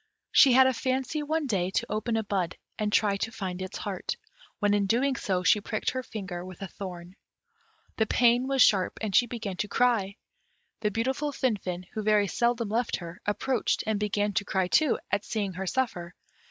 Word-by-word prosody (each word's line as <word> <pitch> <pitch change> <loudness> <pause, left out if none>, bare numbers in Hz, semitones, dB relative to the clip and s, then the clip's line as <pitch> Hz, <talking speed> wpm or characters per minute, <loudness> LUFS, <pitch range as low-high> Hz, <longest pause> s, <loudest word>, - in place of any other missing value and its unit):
She 265 -4 +7
had 260 +1 +7
a 260 - +3
fancy 260 +4 -1
one 310 +1 -1
day 190 -8 0
to 190 - -1
open 220 +2 -1
a 220 - 0
bud, 190 -4 -2 0.2
and 210 -1 0
try 205 -2 +3
to 225 - -3
find 185 -4 -5
its 185 - -5
heart, 195 -3 -4 0.4
when 205 -1 +2
in 205 -1 +2
so 230 - +4
doing 240 -9 0
she 205 +4 +4
pricked 215 +1 -2
her 255 - -3
finger 190 -7 -6
with 185 +1 -9
a - - -4
thorn. 180 -2 -8 0.8
The 220 - +2
pain 245 +3 +3
was 270 -1 +5
sharp, 190 -3 +3
and 215 -3 -2
she 245 - +5
began 215 -5 -5
to 210 - -1
cry; 215 -4 +1 0.6
the 210 - +1
beautiful 265 +7 -1
Finfin, 190 -9 -2
who 215 - -3
very 210 -1 +3
seldom 235 +1 0
left 230 +2 0
her, 170 -1 -8
approached, 240 +4 0
and 215 -2 0
began 205 0 0
to 205 - +1
cry 190 -2 0
too, 300 - +3
at 205 +1 +1
seeing 205 -4 -2
her 190 +1 -5
suffer. 180 -8 -2
210 Hz, 195 wpm, -28 LUFS, 190-245 Hz, 0.8 s, She